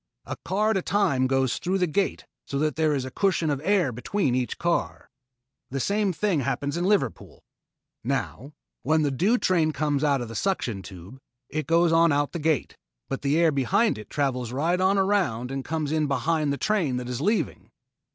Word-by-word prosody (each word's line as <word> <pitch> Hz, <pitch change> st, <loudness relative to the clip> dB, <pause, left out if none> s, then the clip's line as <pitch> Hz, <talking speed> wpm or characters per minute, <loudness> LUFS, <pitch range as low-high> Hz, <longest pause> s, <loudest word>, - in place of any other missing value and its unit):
A -, -, -5 dB
car 210 Hz, +4 st, +1 dB
at 210 Hz, -, +1 dB
a -, -, 0 dB
time 175 Hz, -11 st, +1 dB
goes 135 Hz, -1 st, +1 dB
through 185 Hz, +2 st, 0 dB
the 180 Hz, -, +2 dB
gate 190 Hz, +4 st, -1 dB, 0.2 s
so 140 Hz, -, -3 dB
that 150 Hz, 0 st, 0 dB
there 155 Hz, -1 st, +2 dB
is 130 Hz, -2 st, -2 dB
a 130 Hz, -, -7 dB
cushion 170 Hz, -2 st, +1 dB
of 140 Hz, -1 st, -2 dB
air 185 Hz, -7 st, +2 dB
between 130 Hz, -, -1 dB
each 125 Hz, -1 st, -1 dB
car. 170 Hz, 0 st, -2 dB, 0.6 s
The 135 Hz, -, -3 dB
same 200 Hz, +6 st, +1 dB
thing 185 Hz, -1 st, 0 dB
happens 140 Hz, +2 st, -2 dB
at 170 Hz, -, -1 dB
Liverpool. 190 Hz, -, -1 dB, 0.6 s
Now, 140 Hz, +7 st, -3 dB, 0.3 s
when 155 Hz, +4 st, +2 dB
the 145 Hz, -, +1 dB
due 195 Hz, -, +2 dB
train 170 Hz, -8 st, +2 dB
comes 145 Hz, 0 st, -1 dB
out 140 Hz, -2 st, +2 dB
of 120 Hz, -, -4 dB
the 115 Hz, -, -8 dB
suction 120 Hz, -, -1 dB
tube, 95 Hz, +6 st, -11 dB, 0.3 s
it 155 Hz, -3 st, -3 dB
goes 170 Hz, +1 st, +3 dB
on 165 Hz, 0 st, +5 dB
out 145 Hz, 0 st, +1 dB
the 170 Hz, -, -4 dB
gate, 155 Hz, -3 st, 0 dB, 0.3 s
but 135 Hz, -, -3 dB
the 145 Hz, +2 st, +1 dB
air 165 Hz, -1 st, +4 dB
behind 190 Hz, -, +1 dB
it 105 Hz, -, -11 dB
travels 125 Hz, -5 st, -1 dB
right 165 Hz, +8 st, 0 dB
on 190 Hz, +2 st, +3 dB
around 180 Hz, -, +1 dB
and 135 Hz, 0 st, -3 dB
comes 155 Hz, 0 st, -2 dB
in 155 Hz, -1 st, +1 dB
behind 155 Hz, +1 st, 0 dB
the 140 Hz, -, -1 dB
train 175 Hz, -12 st, 0 dB
that 125 Hz, -1 st, -5 dB
is 125 Hz, +1 st, -4 dB
leaving." 210 Hz, +7 st, -1 dB
155 Hz, 200 wpm, -25 LUFS, 135-185 Hz, 0.6 s, on